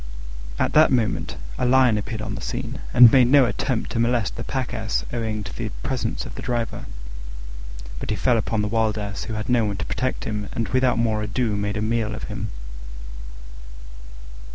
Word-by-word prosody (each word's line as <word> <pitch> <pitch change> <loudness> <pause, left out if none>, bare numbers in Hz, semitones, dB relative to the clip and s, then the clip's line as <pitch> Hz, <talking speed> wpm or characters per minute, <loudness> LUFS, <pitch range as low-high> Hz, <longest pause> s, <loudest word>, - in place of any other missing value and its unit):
At - - 0
that 155 -1 +6
moment 115 -6 0 0.2
a 125 - +1
Lion 130 -2 +5
appeared 105 +1 -3
on 105 - -4
the 115 - -6
scene, 125 +1 -4
and 120 -2 +9
made 130 -3 +6
no 135 +1 +6
attempt 120 0 -2
to 115 - -1
molest 115 -2 +1
the - - -5
Pack 130 -1 -3
Ass 110 0 -2
owing 110 -3 -2
to 95 - -8
the - - -3
presence - - -2
of - - -8
the - - -7
driver; 120 -2 -3 1.1
but - - -6
he 105 - +1
fell 120 +1 +2
upon 110 0 -1
the - - 0
Wild 110 0 +1
Ass, 100 -1 -4
who 110 - -4
had 105 0 -4
no 120 -2 +3
one 100 -2 -2
to 85 - -4
protect 130 0 -2
him, 105 -1 -3
and 115 - -2
without 130 -2 +2
more 110 -2 +1
ado 105 +1 -1
made 105 0 -2
a 105 - -1
meal 110 -1 0
of 105 - -8
him. 105 0 -4
115 Hz, 200 wpm, -23 LUFS, 105-125 Hz, 1.1 s, and